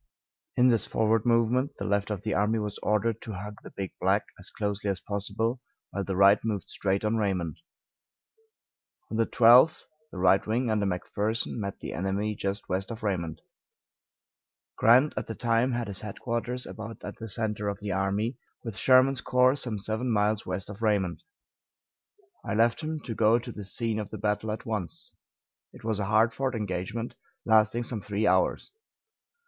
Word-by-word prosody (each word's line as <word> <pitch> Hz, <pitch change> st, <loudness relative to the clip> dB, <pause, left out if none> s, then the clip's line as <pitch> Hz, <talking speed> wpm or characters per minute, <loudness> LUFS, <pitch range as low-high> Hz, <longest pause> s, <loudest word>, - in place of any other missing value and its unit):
In 125 Hz, +1 st, +6 dB
this 115 Hz, -3 st, +2 dB
forward 110 Hz, +1 st, +1 dB
movement 120 Hz, +4 st, +2 dB
the -, -, -4 dB
left 100 Hz, 0 st, 0 dB
of 105 Hz, -3 st, -3 dB
the -, -, -1 dB
army 105 Hz, +3 st, +2 dB
was 105 Hz, -2 st, -3 dB
ordered 105 Hz, +1 st, 0 dB
to 110 Hz, -, -6 dB
hug 105 Hz, +2 st, -7 dB
the -, -, -10 dB
Big 95 Hz, -2 st, -5 dB
Black -, -, +2 dB
as -, -, -8 dB
closely 105 Hz, -1 st, -2 dB
as 95 Hz, -2 st, -1 dB
possible, 105 Hz, +5 st, -2 dB, 0.3 s
while 100 Hz, -, -2 dB
the 95 Hz, -1 st, -3 dB
right 100 Hz, +2 st, +6 dB
moved 105 Hz, -4 st, -2 dB
straight 100 Hz, +1 st, -1 dB
on 110 Hz, +1 st, +1 dB
Raymond. 95 Hz, -6 st, -1 dB, 1.5 s
On 110 Hz, -, -2 dB
the 115 Hz, -, +2 dB
12th, 125 Hz, +6 st, +6 dB, 0.3 s
the -, -, -9 dB
right 95 Hz, +1 st, +4 dB
wing, 115 Hz, +2 st, 0 dB
under 105 Hz, -2 st, +1 dB
McPherson, 105 Hz, +4 st, -2 dB
met 100 Hz, -3 st, -4 dB
the -, -, -5 dB
enemy 95 Hz, +5 st, -1 dB
just 100 Hz, 0 st, -3 dB
west 95 Hz, +1 st, -2 dB
of 115 Hz, -1 st, -7 dB
Raymond. 85 Hz, -6 st, -2 dB, 1.3 s
Grant 125 Hz, +6 st, +5 dB
at -, -, -3 dB
the 115 Hz, -, -5 dB
time 120 Hz, +3 st, +1 dB
had 120 Hz, -1 st, -2 dB
his 100 Hz, -2 st, -3 dB
headquarters 120 Hz, +4 st, -3 dB
about 110 Hz, +1 st, -8 dB
at -, -, -7 dB
the 115 Hz, -1 st, -6 dB
center 105 Hz, 0 st, -1 dB
of 100 Hz, -1 st, -4 dB
the 105 Hz, -1 st, -4 dB
army, 100 Hz, +6 st, -1 dB, 0.2 s
with 115 Hz, -5 st, -6 dB
Sherman's 130 Hz, +1 st, +5 dB
corps, 125 Hz, +1 st, +4 dB
some 120 Hz, -6 st, -2 dB
seven 110 Hz, +5 st, -2 dB
miles 105 Hz, -1 st, +1 dB
west 90 Hz, +1 st, -3 dB
of 105 Hz, +1 st, -9 dB
Raymond. 100 Hz, -5 st, +1 dB, 1.2 s
I 105 Hz, -, -2 dB
left 115 Hz, +5 st, +3 dB
him 155 Hz, -1 st, -3 dB
to 120 Hz, -, -5 dB
go 110 Hz, +1 st, +4 dB
to 120 Hz, 0 st, -6 dB
the 105 Hz, -, -7 dB
scene 110 Hz, +3 st, -2 dB
of 105 Hz, -, -5 dB
the 110 Hz, -, -6 dB
battle 105 Hz, +1 st, -1 dB
at 110 Hz, -, -5 dB
once. 105 Hz, -6 st, -3 dB, 0.6 s
It -, -, -14 dB
was 110 Hz, -2 st, -1 dB
a 100 Hz, -, -1 dB
hard 110 Hz, +3 st, +3 dB
fought 135 Hz, -2 st, -1 dB
engagement, 105 Hz, +3 st, -3 dB, 0.3 s
lasting 110 Hz, +1 st, +4 dB
some 115 Hz, -2 st, -4 dB
three 105 Hz, +2 st, -1 dB
hours. 95 Hz, -1 st, +2 dB
110 Hz, 180 wpm, -28 LUFS, 100-115 Hz, 1.5 s, In